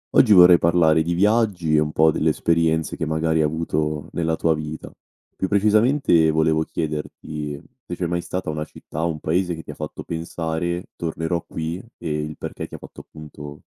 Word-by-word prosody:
Oggi 110 - +6
vorrei 90 -2 +8
parlare 80 -2 +4
di 85 +2 -1
viaggi 100 -4 +2
e - - +5
un 75 0 0
po' 80 0 +4
delle 80 - +1
esperienze 80 -1 +1
che 80 - -2
magari 80 0 +1
ha - - +3
avuto 75 -1 -2
nella 80 -1 -1
tua 80 0 +2
vita. 75 0 -6 0.4
Più 95 - -2
precisamente 105 - +3
volevo 80 0 +2
chiederti 75 -2 -5 0.3
se 90 - -4
c'è 90 - -2
mai 85 0 -1
stata 85 -1 -4
una 75 0 -3
città 80 +1 -7
o 85 - +1
un 75 -2 -4
paese 90 +2 0
che 80 - -9
ti 75 - -8
fatto 75 +1 -7
pensare: 85 +1 -3
"Tornerò 85 +1 -2
qui", 80 +3 -4 0.2
e 85 - -5 0.2
il 75 -1 -8
perché - - -6
ti - - -9
fatto, - - -12
appunto, 75 -1 -11
80 Hz, 185 wpm, -22 LUFS, 80-85 Hz, 0.4 s, vorrei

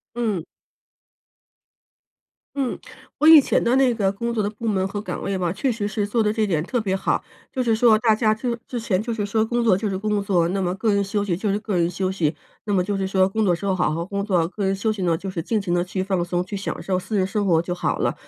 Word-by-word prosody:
嗯。 215 -8 -1 2.1
嗯， 265 -3 -1 0.4
我 305 - +2
以 320 -1 +10
前 - - +1
的 240 - +3
那 265 -2 +4
个 200 -3 +1
工 235 +4 -3
作 220 - +1
的 205 - -1
部 220 +2 -5
门 190 -2 +1
和 205 +1 -4
岗 185 -4 -5
位 195 -1 -2
吧， 175 -2 0
确 255 +6 0
实 210 -2 -3
是 210 -1 -1
做 225 +2 +1
得 210 - +1
这 215 0 0
点 160 -6 0
特 245 +8 -2
别 200 -4 -1
好， 190 - 0 0.3
就 260 - -2
是 230 -2 +2
说 220 -1 +5
大 220 -1 +4
家 215 0 +2
就 235 +2 -2
之 245 - -3
前 215 -5 0
就 230 +1 -3
是 210 -2 -2
说 220 +2 +1
工 235 +2 0
作 220 -5 +5
就 205 +3 -1
是 195 - -2
工 210 +1 -1
作， 180 -4 +2
那 195 +2 -1
么 180 -1 -1
个 210 +3 0
人 200 0 +2
休 200 +1 -1
息 190 -4 0
就 205 +4 -1
是 200 - +1
个 210 -2 -3
人 170 0 +2
休 185 +1 -2
息。 160 -5 0 0.3
那 210 - -2
么 185 -2 +2
就 200 +1 -2
是 195 -1 -1
说 190 -1 +3
工 220 +3 0
作 185 - +3
时 170 - -7
候 195 - +2
好 180 -4 +1
好 165 +2 -2
工 200 +2 -3
作， 180 -5 +2
个 200 +2 -4
人 195 0 +1
休 215 +3 0
息 205 -3 -5
呢， 170 -2 +2
就 195 - -7
是 175 -3 -4
尽 220 +5 0
情 190 -3 -3
地 175 - +2
去 185 +1 -3
放 190 -2 0
松， 175 0 -1
去 205 - -8
享 195 - -4
受 190 - -1
私 210 +4 -4
人 190 -2 +2
生 205 +2 -1
活 165 -4 +4
就 175 +1 -3
好 - - -1
了。 - - 0
200 Hz, 300 characters per minute, -23 LUFS, 185-220 Hz, 2.1 s, 以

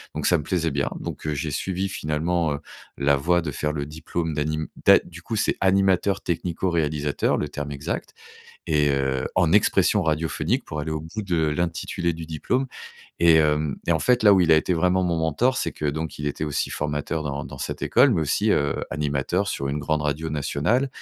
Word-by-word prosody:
donc, - - -3
ça 90 - +4
me 75 - -4
plaisait 85 -1 0
bien, 70 0 0
donc - - -6
heu, 75 - 0
j'ai 75 +1 -3
suivi, 95 +6 -2
finalement, 80 -1 -1
heu, 70 - -4 0.4
la 70 0 +3
voie 85 +5 +2
de 80 -3 -4
faire 75 +2 -2
le 70 -1 -3
diplôme 80 +2 -4
d'anim 75 +1 -2 0.2
d'a - - +8
du 85 -1 -13
coup, 110 +6 -4
c'est - - +1
animateur 95 0 +2
technico-réalisateur, 80 -4 -1
le 75 - -2
terme 75 0 -5
exact 70 0 -4 0.5
et 75 -2 +3
heu, 65 -1 0
en 85 -2 +3
expression 100 -1 +3
radiophonique 80 0 0
pour 75 0 -4
aller 80 - -4
au 80 - -2
bout 80 +8 -6
de 85 -5 0
l'intitulé 85 +2 -1
du 80 0 -7
diplôme 125 - -1 0.5
et 85 -1 +6
hem 75 -2 +2
et - - +3
en 80 - +2
fait, 125 +4 +2
là, 105 -2 +7
où 95 - +5
il 85 -2 +4
a 80 - +7
été 90 +3 +1
vraiment 90 +2 +2
mon 85 -2 0
mentor, 115 - +1
c'est - - -1
que 75 - -4
donc 80 +1 -3
il 75 - -3
était 75 - -3
aussi 75 -2 -2
formateur 75 +1 -2
dans 70 0 -3
dans 65 +2 -9
cette - - -5
école 140 - +5
mais 85 - +1
aussi, 100 +8 +1
heu, 70 -1 +1
animateur 75 +7 -1
sur 70 - -2
une 75 +2 -2
grande 75 +1 0
radio 75 +2 -2
nationale 75 - 0
80 Hz, 210 wpm, -24 LUFS, 75-90 Hz, 0.5 s, d'a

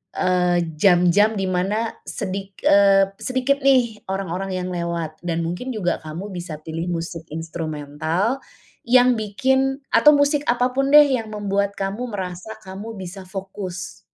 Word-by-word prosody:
eee, 180 -1 +2 0.2
jam-jam 180 +4 +4
di 195 - -1
mana 200 +5 -1
sedik 195 +1 -5
eee, 195 -1 +5
sedikit 260 +2 0
nih, 245 -5 +3
orang-orang 195 0 -3
yang 185 0 -3
lewat 170 -2 -3
dan 170 -1 -1
mungkin 180 +10 -4
juga 190 -6 -1
kamu 165 +6 -6
bisa 175 -4 -6
pilih 160 +2 -4
musik 165 -1 -4
instrumental, 160 - -2 0.5
yang 250 0 +5
bikin 265 +6 0
atau 300 - +7
musik 285 0 +2
apapun 250 +3 +1
deh 300 0 +10
yang 230 -4 -1
membuat 200 -1 -1
kamu 195 +5 -3
merasa 190 +1 -5
kamu 195 +4 -7
bisa 190 +1 -8
fokus. 190 -1 -6
195 Hz, 135 wpm, -22 LUFS, 175-230 Hz, 0.5 s, deh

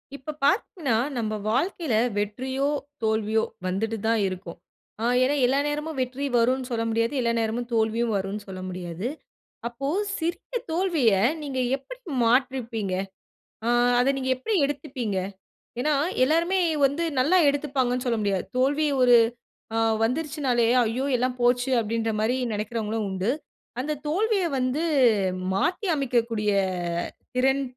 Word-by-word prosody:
இப்ப 280 +3 -6
பார்த்தீங்கனா, 330 - +1 0.2
நம்ம 220 -2 -1 0.2
வாழ்க்கையில 300 - 0 0.2
வெற்றியோ, 260 +7 -1 0.4
தோல்வியோ 220 0 +1 0.2
வந்துட்டு 220 +5 -1
தான் 225 0 +3
இருக்கும். 185 -2 -6 0.4
ஆ - - 0 0.2
ஏனா 275 +3 +2
எல்லா 265 +3 +2
நேரமும் 300 +1 -3
வெற்றி 260 +2 -3
வருன்னு 250 +2 +2
சொல்ல 230 -1 0
முடியாது. 230 +3 0
எல்லா 235 -1 +1
நேரமும் 230 +2 -1
தோல்வியும் 225 0 +1
வருன்னு 195 +2 -3
சொல்ல 190 -1 -7
முடியாது. 180 +2 -5 0.6
அப்போ 240 +4 -5 0.3
சிறிய 345 +8 -3
தோல்விய 325 - +2 0.3
நீங்க 270 -3 -3 0.2
எப்பிடி - - -12 0.2
மாற்றியிருப்பீங்க? 235 -5 +1 0.7
ஆ - - +2 0.3
அத 265 +3 +3
நீங்க 260 -1 -2
எப்பிடி 425 - -2
எடுத்துப்பீங்க? 265 -8 -3 0.6
ஏனா, 300 +2 +2 0.3
எல்லோருமே 335 +7 +2 0.3
வந்து 285 +5 0 0.2
நல்லா 305 +9 +4
எடுத்துப்பாங்கன்னு 265 -3 0
சொல்ல 235 -2 +1
முடியாது. 200 -3 0
தோல்வி 285 +4 +2
ஒரு 245 -1 +7 0.6
ஆ - - +1 0.3
வந்துருச்சுனாலே, 265 -1 +1 0.2
"ஐயோ! 235 +4 -1
எல்லாம் 250 +1 0
போச்சு" 245 +1 +3
அப்பிடின்ற 225 0 -1
மாரி 220 +4 +1 0.2
நினைக்கிறவங்களும் 215 0 -2
உண்டு. 190 +5 0 0.5
அந்த 295 +4 -1
தோல்விய 400 +5 +1
வந்து 255 +4 0 0.7
மாத்தியமைக்கக்கூடிய 240 - 0 0.8
திறன் 265 +2 +2
250 Hz, 125 wpm, -25 LUFS, 225-285 Hz, 0.8 s, ஒரு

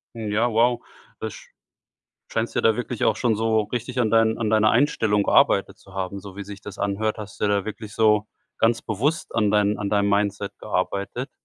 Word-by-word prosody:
Ja, 110 +2 0
wow. 120 +2 +3 0.4
Da - - -3
sch - - -13 0.8
scheinst 115 +1 -2
dir - - +2
da 110 - +4
wirklich 125 -1 -2
auch - - +3
schon 120 -3 +1
so 110 0 +2
richtig 125 +1 -3
an 110 -3 +2
deinen 115 0 +3
an 110 -2 -1
deiner 110 -1 +4
Einstellung 110 -5 +2
gearbeitet - - +3
zu - - -18
haben, 95 +1 -4
so 95 -1 -11
wie 100 - -6
sich 100 0 -9
das 100 -1 -9
anhört. 105 +2 -1
Hast 105 -2 -9
du - - +1
dir 105 - +1
da 100 0 0
wirklich 110 -1 -7
so 105 -1 +3 0.3
ganz 115 0 +2
bewusst 130 +9 -2
an 105 -2 +2
deinem 105 0 +2
an 100 -1 -3
deinem 100 0 +2
Mindset 100 0 0
gearbeitet. 100 +8 -2
110 Hz, 205 wpm, -23 LUFS, 100-115 Hz, 0.8 s, da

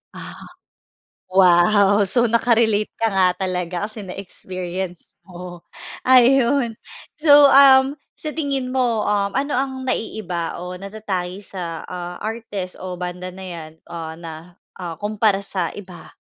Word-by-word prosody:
Ah, - - -9 0.9
wow. 195 +3 +5
So 240 +3 +2
naka-relate 225 -2 +2
ka 225 - +2
nga 190 -1 +4
talaga 180 0 -2
kasi 215 -1 -8
na-experience 185 -1 -7
mo. 175 -1 -9 0.5
Ayon, 255 -1 +4 0.4
so, 290 -2 +7
um, 270 0 +7 0.2
sa 305 - -5
tingin 275 -4 -2
mo, 240 -4 +1
um, 200 -1 +1
ano 285 +2 -1
ang 265 +1 -1
naiiba 185 -8 -3
o 180 0 -6
natatangi 195 -2 -5
sa, 170 -4 -6
ah, 180 0 -6
artist 215 -4 -5
o 185 -1 -5
banda 180 0 -5
na 190 0 -9
yan, 165 -3 -8 0.2
o 160 -1 -6
na, 165 +2 -10 0.2
ah, 170 -2 -5
kompara 205 -1 +1
sa 180 -4 -2
iba? 185 -4 -11
195 Hz, 130 wpm, -21 LUFS, 180-235 Hz, 0.9 s, so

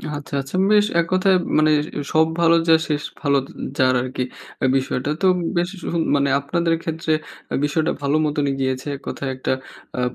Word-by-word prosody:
আচ্ছা, 145 -1 -8
আচ্ছা 135 +6 -5
বেশ। 210 -1 +5
এক 170 - +2
কথায় 185 +1 +4
ম - - -7
মানে, 155 0 +4 0.4
'সব 160 0 +4
ভালো 170 0 +5
যার 160 -1 +5
শেষ 150 -1 0 0.2
ভালো 140 -2 +3 0.3
এয - - -2
যার' 130 -1 +4
আরকি 125 0 -3 0.4
এ্যা - - +2
বিষয়টা। 130 +1 -2
তো - - +2
উম 180 - -2 0.2
বেশ 175 +1 +1 0.2
উ - - -1 0.3
মানে 140 0 +2
আপনাদের 165 +4 0
ক্ষেত্রে 160 -1 -1 0.3
অ্যাঁ - - -2
বিষয়টা 155 +2 0
ভালো 140 +2 +1
মতনই 145 -2 0
গিয়েছে 130 +1 -2
এক 140 - -11
কথায় 140 - -4
একটা 130 - -1 0.4
অ্যা 125 - -1
150 Hz, 195 wpm, -21 LUFS, 135-165 Hz, 0.4 s, বেশ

